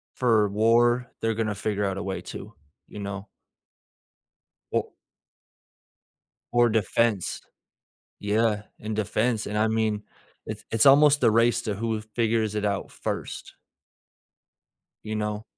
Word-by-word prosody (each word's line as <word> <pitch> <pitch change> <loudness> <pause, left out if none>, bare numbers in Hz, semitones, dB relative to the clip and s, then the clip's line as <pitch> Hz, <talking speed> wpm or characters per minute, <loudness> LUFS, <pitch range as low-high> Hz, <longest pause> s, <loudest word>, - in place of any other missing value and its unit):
for 110 -5 +3
war, 120 +3 +3
they're 115 0 +1
gonna 110 -2 -1
figure 105 0 -1
out 95 -1 -2
a - - -4
way 95 -1 -4
to. - - -9 0.3
You 105 - -10
know? 100 0 -5 1.5
O - - 0 1.6
Or 120 0 +5
defense. 110 -2 0 0.8
Yeah. 105 0 +1 0.2
In 110 0 -4
defense, 110 +2 0
and 105 +1 -3
I 110 +1 +3
mean, 110 -1 0 0.4
it's - - -6
it's 115 +2 +3
almost 145 +1 +6
the - - +5
race 115 +1 +3
to 105 -3 -2
who 110 +1 -2
figures 110 -1 -1
it 105 0 -1
out 100 -1 -2
first. - - -5 1.5
You 110 0 -4
know? 105 0 -2
110 Hz, 125 wpm, -26 LUFS, 105-115 Hz, 1.6 s, almost